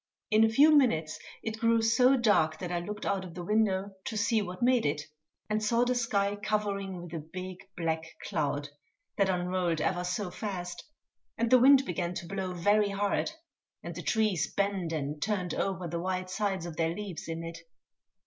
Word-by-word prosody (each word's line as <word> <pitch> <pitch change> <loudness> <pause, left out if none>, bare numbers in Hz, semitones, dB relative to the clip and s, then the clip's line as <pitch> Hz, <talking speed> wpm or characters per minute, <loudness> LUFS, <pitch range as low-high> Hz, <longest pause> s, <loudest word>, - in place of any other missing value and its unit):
In 215 +1 +6
a 225 - +5
few 295 +7 +6
minutes 165 - +2 0.2
it 220 0 -4
grew 230 0 +3
so 250 +4 +5
dark 185 -10 +3
that 180 +1 -5
I 175 - 0
looked 210 +4 -6
out 195 -1 0
of 175 -2 -10
the 175 - -5
window 200 -1 +1
to 220 - -3
see 215 +1 +2
what 185 +3 -5
made 250 -1 +4
it, 145 0 0 0.4
and 215 0 -1
saw 235 +3 +3
the 250 - +2
sky 205 -4 0
covering 200 -3 -2
with 175 -1 -10
a 165 - -3
big 185 +4 -7 0.2
black 160 -1 -1 0.2
cloud 145 -2 -1 0.5
that 195 -2 +3
unrolled 180 -2 0
ever 175 +3 0
so 180 +1 -2
fast, 180 -3 -5 0.5
and 230 +1 0
the 255 - +8
wind 270 +2 +7
began 175 -2 -2
to 175 - -5
blow 190 -1 -3
very 205 +4 +3
hard, 200 0 0 0.5
and - - -5
the - - -6
trees 215 -6 +1
bent 200 -4 -1
and 150 -1 -3
turned 190 -3 -1
over 185 -2 -2
the 170 +1 -3
white 185 0 -2
sides 195 -3 -1
of 170 -2 -7
their 165 0 0
leaves 200 -4 -6
in 165 0 -4
it. 165 0 -7
190 Hz, 190 wpm, -30 LUFS, 175-215 Hz, 0.5 s, the